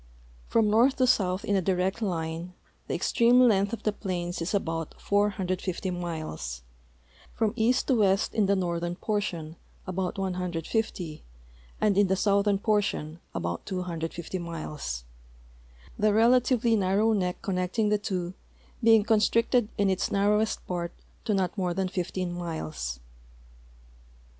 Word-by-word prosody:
From 225 -2 +3
north 235 +6 +4
to 255 - +3
south 190 -4 +2
in 205 - +1
a 190 - +3
direct 185 +4 0
line 170 -2 -3 0.3
the - - -1
extreme 240 +2 +4
length 200 -5 +4
of 230 - -5
the 215 - +2
plains 175 -4 -4
is 165 - -2
al)Out 165 -5 -2
450 190 -2 0
miles, 155 - -5 0.7
from 220 -2 +1
east 240 +3 +2
to 270 - +2
west 200 -4 +2
in 215 -3 +2
the 200 - +3
northern 175 -2 -1
portion 175 -6 -3 0.3
about 185 +1 -3
150 180 -2 -2 0.6
and 205 -2 +2
in 205 - +5
the 190 - +2
southern 200 +1 +2
j>ortion 200 -7 0 0.2
al)out 85 -1 -3
250 170 -1 -4
miles, 155 - -5 1.0
the 215 0 +4
relatively 235 +1 +4
narrow 205 +3 +2
neck 180 -4 -1
connecting 190 +3 0
the 210 0 +2
two 185 -4 -3 0.5
being 225 -2 +6
constricted 225 +1 +2
in 205 - +2
its 190 - 0
narrowest 210 +2 +1
part 175 -1 -3 0.3
to 210 - +1
not 185 -2 0
more 180 -4 -1
than 190 0 0
15 180 -1 -3
miles. 155 - -4
190 Hz, 135 wpm, -27 LUFS, 175-210 Hz, 1.0 s, being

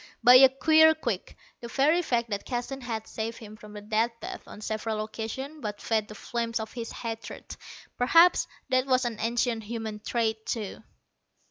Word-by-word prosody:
By 245 - +9
a 265 0 +9
queer 315 +4 +5
quirk, 235 -11 -4 0.2
the 235 - -7
very 290 +8 +3
fact 235 -8 -1
that 200 0 -2
Keston 255 +2 -4
had 225 -3 -4
saved 225 +1 -5
him 215 -1 -11
from 210 -1 -13
the 210 - -8
Death 220 +2 +1
Bath - - -7
on - - -10
several 215 0 -3
occasions 235 +7 -6
but 210 -3 -4
fed 220 -2 0
the 210 - -10
flames 230 +1 -3
of 220 0 -6
his 230 -2 -5
hatred. 225 -1 -7 0.4
Perhaps 335 +8 +5 0.2
that 255 +1 +2
was 255 -1 +2
an 230 -3 -3
ancient 235 0 0
human 220 -1 -5
trait, 220 0 -1
too. 215 -4 -3
230 Hz, 175 wpm, -27 LUFS, 220-255 Hz, 0.4 s, By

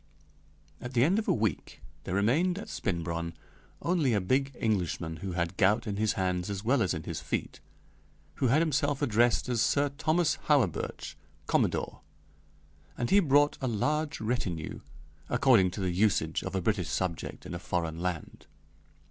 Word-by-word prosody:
At 125 +1 -6
the 120 - +5
end 185 +9 +3
of 220 - -4
a - - +4
week 110 -2 -1 0.3
there 90 - -2
remained 150 - +2
at 205 - -7
Spinbronn 85 -2 -3 0.5
only 160 -9 +2
a - - +3
big 130 +8 +1
Englishman 90 -6 -1
who 95 0 -5
had 85 +1 -2
gout 105 +4 +3
in 100 -2 -3
his 110 0 +1
hands 90 0 -1
as 100 0 -4
well 125 +3 +2
as 90 -3 +1
in 80 - -5
his - - -5
feet, - - -3 0.8
who 130 - +2
had 145 +7 +4
himself 145 -2 0
addressed 120 -4 +2
as 120 -3 0
Sir 145 +3 +2
Thomas 160 +1 +2
Hawerburch, 135 - 0 0.3
Commodore; - - 0 1.0
and 120 - -2
he 200 - +7
brought 145 -4 +3
a 130 - -1
large 150 +7 -1
retinue, 110 -9 -3 0.5
according 125 -7 +4
to 90 - -7
the 90 -1 0
usage 100 +4 +1
of - - -5
a 95 - 0
British 95 -3 0
subject 90 -3 -3
in - - -7
a 85 - -4
foreign 85 -2 -2
land. 90 -3 -4
110 Hz, 165 wpm, -29 LUFS, 90-140 Hz, 1.0 s, he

